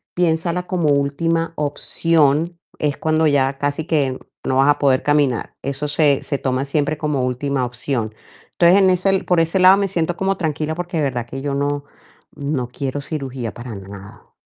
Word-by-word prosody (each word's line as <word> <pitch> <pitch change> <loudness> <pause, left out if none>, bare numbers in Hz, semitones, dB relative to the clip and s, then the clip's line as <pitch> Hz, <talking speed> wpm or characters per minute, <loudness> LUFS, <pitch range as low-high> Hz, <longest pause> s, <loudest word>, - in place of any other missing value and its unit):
piénsala 175 +1 0
como 170 -5 0
última 165 +4 0
opción, 155 +2 +1 0.2
es 145 -2 0
cuando 155 0 +2
ya 135 -1 +2
casi 145 +2 -1
que 140 -6 0 0.3
no 130 - +1
vas 135 +2 +4
a 145 - +4
poder 135 -2 +3
caminar". 145 -5 +1
Eso 140 +2 -3
se 145 -1 +2
se 140 - -2
toma 130 +1 -1
siempre 145 +1 0
como 150 -4 -1
última 130 +1 -1
opción. 120 -2 -3 0.4
Entonces, 175 +2 +5
en 190 - +5
ese 190 +1 +2
por 180 -2 +2
ese 165 +3 0
lado 185 +2 +7
me 200 -1 +1
siento 175 -1 -1
como 195 0 0
tranquila, 155 -1 -2
porque 175 0 -4
de 155 - +1
verdad 125 -4 -1
que 135 +3 -7
yo 140 -1 -2
no 145 0 -1 0.5
no 140 -4 -2
quiero 135 +2 -4
cirugía 135 -5 -5
para 120 -1 -8
nada. 100 0 -11
145 Hz, 180 wpm, -20 LUFS, 135-165 Hz, 0.5 s, lado